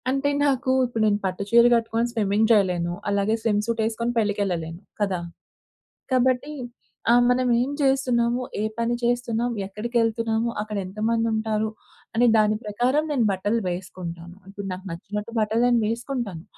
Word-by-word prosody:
అంటే 275 +2 +1 0.2
నాకు 265 -1 +1
ఇప్పుడు 235 -2 -3
నేను 205 -1 +2
పట్టు 185 +1 -2
చీర 235 +1 +6
గట్టుకొని 230 0 +1
స్విమ్మింగ్ 215 -1 +1
జేయలేను, 180 -5 +2 0.2
అలాగే 200 +1 +1
స్విమ్ 210 -2 +1
సూట్ 230 0 -1
ఎసుకొని 230 +1 -2
పెళ్ళికేళ్ళలేను 185 -6 -2 0.2
కదా! 195 -3 +1 0.9
కాబట్టి 255 +3 +2 0.6
ఆ! - - +7 0.2
మనమేం 250 0 +2
చేస్తున్నాము? 255 -3 +2 0.2
ఏ - - 0 0.2
పని 235 +1 +1
చేస్తున్నాం 240 0 0
ఎక్కడికేళ్తున్నాము? 225 +2 0
అక్కడ 210 0 -4
ఎంతమందుంటారు? 220 +1 0 0.5
అనే 240 +2 +4
దాని 215 0 +3
ప్రకారం 245 +8 +1
నేను 255 -6 +2
బట్టలు 205 +4 0
వేసుకుంటాను. 175 -1 -7
ఇప్పుడు 200 0 -7
నాకు 185 +2 -9
నచ్చినట్టు 210 +6 -5
బట్టలు 220 +2 +1
నేను 240 -1 +3
వేసుకుంటాను 230 - -3
225 Hz, 135 wpm, -24 LUFS, 205-240 Hz, 0.9 s, ఆ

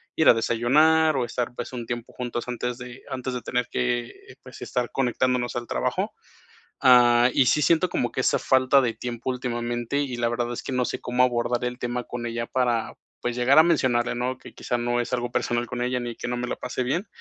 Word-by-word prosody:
ir 160 - +5
a - - +9
desayunar 150 +7 +3
o 125 - +1
estar, 120 +1 -3
pues, - - -6
un 120 -2 -5
tiempo 120 -1 -5
juntos 120 -1 -4
antes 125 0 -3
de 125 +1 -10
antes 130 0 -4
de 125 - -4
tener 125 +1 -1
que, 120 -1 -1 0.2
eh, - - -12
pues, - - -12
estar 125 -1 -2
conectándonos 125 -1 0
al 120 -1 -5
trabajo, - - -1 0.7
ah, 120 -1 +6
y 130 - +3
sí 150 +4 +3
siento 170 +5 +3
como 120 - -1
que 130 - -2
esa - - +2
falta 130 +1 +4
de 120 -3 0
tiempo 120 +2 -4
últimamente, 120 0 -2
y 135 -4 -2
la 120 0 0
verdad 120 0 -2
es - - -6
que - - -4
no 125 -1 +1
sé - - -3
cómo 125 0 +1
abordar 120 -1 +1
el 125 0 -3
tema 125 0 -3
con 120 0 -5
ella 115 0 -3
para, 120 -3 0 0.3
pues, 120 0 -2
llegar 125 +3 +3
a - - +10
mencionarle, 130 -8 +1
¿no?, 125 +1 -2
que - - -13
quizá 120 - -2
no 120 0 0
es 120 - -4
algo 120 -1 -1
personal 120 0 -1
con 120 0 -5
ella 125 0 -1
ni 120 -1 -5
que - - -5
no 125 - -2
me 125 0 -3
la - - -3
pase 125 0 -3
bien, 155 - -1
125 Hz, 230 wpm, -25 LUFS, 120-130 Hz, 0.7 s, a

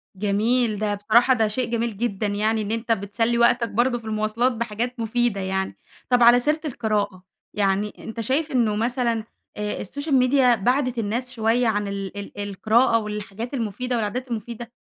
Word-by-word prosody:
جميل، 215 +3 +1
ده 210 -1 0
بصراحة 230 +5 +4
ده 220 -3 +2
شيء 235 +2 -2
جميل 230 -3 -1
جدًا 210 -3 -1
يعني 215 +2 0
إن 210 +1 -4
أنت 230 +1 -2
بتسلّي 225 +3 0
وقتك 235 0 +3
برضه 240 +3 +1
في 230 - -12
المواصلات 215 +3 0
بحاجات 235 +1 -3
مفيدة 230 -2 0
يعني. 190 0 -2 0.3
طب 245 -1 +4
على 240 +1 +8
سيرة 300 +5 +1
القراءة، 210 -7 -2 0.3
يعني 200 +1 0
أنت 225 +1 -8
شايف 295 +7 0
إنه 230 -5 +2
مثلًا، 235 0 0 0.3
آآ 210 0 -3
السوشيال 285 - -2
ميديا 255 -1 +4
بعَدِت 250 +3 0
الناس 235 +4 -2
شوية 230 +1 +1
عن 205 -2 0
ال 200 0 -5
ال 200 0 -8
القراءة 230 +4 +3
والحاجات 210 +3 -6
المفيدة 245 +1 -2
والعادات 235 +4 -2
المفيدة؟ 235 +1 -5
225 Hz, 165 wpm, -23 LUFS, 210-245 Hz, 0.3 s, على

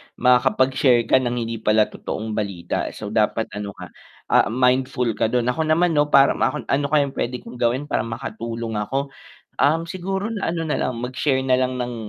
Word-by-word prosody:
Makakapag-share 125 0 +3
ka 130 - +3
ng 125 -1 -2
hindi 115 -1 -4
pala 110 0 +3
totoong 110 +1 -5
balita. 100 -5 -3
So - - -6
dapat - - 0
ano 100 -1 -6
ka, - - -10 0.4
ah, - - +5
mindful 125 +1 +1
ka - - +3
dun. 120 +1 0
Ako 160 +3 -2
naman 170 +2 +3
'no, 150 -2 +2
para 140 -1 +5
makon 150 - -1
"Ano 140 +1 +1
kayang 145 -2 +2
pwede 125 -1 -4
kong 125 - -10
gawin 130 +5 0
para 110 - 0
makatulong 115 -1 -5
ako?" 135 +6 -2 0.5
Um, 160 +4 +2
siguro 190 +3 -3
na 225 -5 -2
ano 165 -1 -3
nalang, 130 -5 -1
mag-share 130 +3 -1
nalang 130 0 +1
ng 125 0 -3
125 Hz, 180 wpm, -22 LUFS, 115-145 Hz, 0.5 s, ah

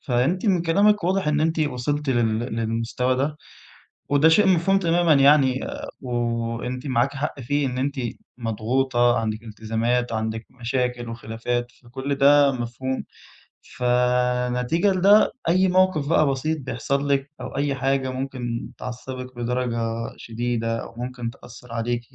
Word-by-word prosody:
فأنتِ 140 - 0
من 180 -4 +3
كلامِك 200 +4 +3
واضح 185 -2 +1
إن 150 0 +1
أنتِ 160 +1 +1
وصلتِ 145 +1 -1
لل 115 -3 +1 0.2
للمستوى 115 +3 -1
ده 145 +3 -1 0.7
وده 145 +3 +5
شيء 200 +6 +5
مفهوم 190 +1 +3
تمامًا 170 -2 +3
يعني 140 -2 +5 0.4
وأنتِ 120 +1 -3
معاك 125 +2 +1
حق 140 +1 -3
فيه، 145 +3 0
إن 125 0 -4
أنتِ 140 +2 -1 0.4
مضغوطة، 120 +2 +1
عندِك 110 0 -3
التزامات 115 +3 -1
وعندِك 110 0 -3 0.2
مشاكل 125 0 -1
وخلافات، 120 +1 -3
فكل 130 +3 -4
ده 140 0 +5
مفهوم، 130 +1 -3 0.7
فنتيجة 125 +6 +1
لده 200 +3 +5 0.2
أي 185 +2 +4
موقف 185 -5 +2
بقى 155 -3 +4
بسيط 155 +4 -1
بيحصَل 140 +2 -2
لِك 140 0 0
أو - - -7
أي 140 -1 0
حاجة 135 0 0
ممكن 130 -3 -4
تعصّبِك 125 +1 -7
بدرجة 120 0 -2 0.4
شديدة 115 0 -2
أو - - -11
ممكن 125 -1 -4
تأثّر 120 -1 -12
عليكِ 120 +1 -1
125 Hz, 135 wpm, -23 LUFS, 120-145 Hz, 0.7 s, وده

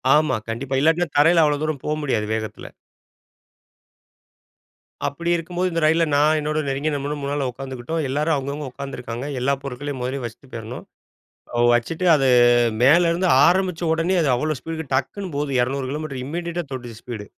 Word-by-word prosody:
ஆமா 155 +1 +2
கண்டிப்பா. 130 +4 -3
இல்லாட்டினா 165 +3 +3
தரையில 165 +3 +6
அவ்ளோ 145 -1 +1
தூரம் 155 -3 -3
போக 150 - 0
முடியாது 115 -7 0
வேகத்துல. 110 -1 -6 2.4
அப்டி 170 +5 -3
இருக்கும்போது, 175 +2 -2
இந்த 165 -1 -1
ரயில்ல 165 +2 +4
நான் 150 +2 +4
என்னோட 150 +1 -1
நெருங்கிய 140 +3 -1
நண்பனும் 145 +1 -3
முன்னால 140 -1 -1
உட்காந்துக்கிட்டோம். 135 +5 -4
எல்லாரும் 150 +4 +1
அவங்கவங்க 140 +1 -4
உட்கார்ந்துருக்காங்க. 125 -2 -6
எல்லா 135 +3 +1
பொருட்களையும் 140 0 -5
மொதல்லயே 130 +1 -3
வச்சுட்டு 120 +3 -10
போயிருணும். 115 +1 -7 0.9
வச்சுட்டு 160 +9 -2
அது 135 -2 +2 0.5
மேலருந்து 170 +6 +4 0.2
ஆரம்பிச்ச 180 -2 +1
உடனே 165 +3 +1
அது 150 - +1
அவ்ளோ 155 +5 -1
ஸ்பீடுக்கு 160 0 -6
டக்குன்னு 190 +5 -3
போகுது 145 0 -2
200 130 +2 -1
கிலோமீட்டர் 145 -3 -4
இம்மீடியட்டா 170 +3 -3
தொட்டுச்சு 120 -4 -7
ஸ்பீடு 115 -4 -7
145 Hz, 145 wpm, -22 LUFS, 130-160 Hz, 2.4 s, தரையில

